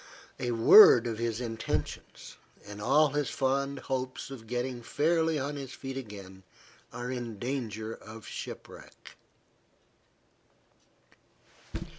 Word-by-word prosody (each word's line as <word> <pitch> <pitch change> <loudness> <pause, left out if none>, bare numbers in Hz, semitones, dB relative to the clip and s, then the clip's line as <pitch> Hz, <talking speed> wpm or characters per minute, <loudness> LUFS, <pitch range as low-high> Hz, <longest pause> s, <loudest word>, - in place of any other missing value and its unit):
A 120 - -2
word 120 - +8
of 115 -2 -3
his 115 -1 -1
intentions, 115 -2 -4 0.3
and 105 0 -9
all 145 +7 +4
his 145 0 -1
fond 140 +1 0
hopes 130 0 -4
of 115 -5 -9
getting 125 +1 -3
fairly 160 +5 +1
on 145 +1 -3
his 135 -2 -7
feet 135 0 -7
again 100 -7 -9 0.5
are 120 +1 -5
in 120 -4 -5
danger 110 -3 -4
of 110 0 -11
shipwreck. - - -9
125 Hz, 110 wpm, -29 LUFS, 115-135 Hz, 0.5 s, word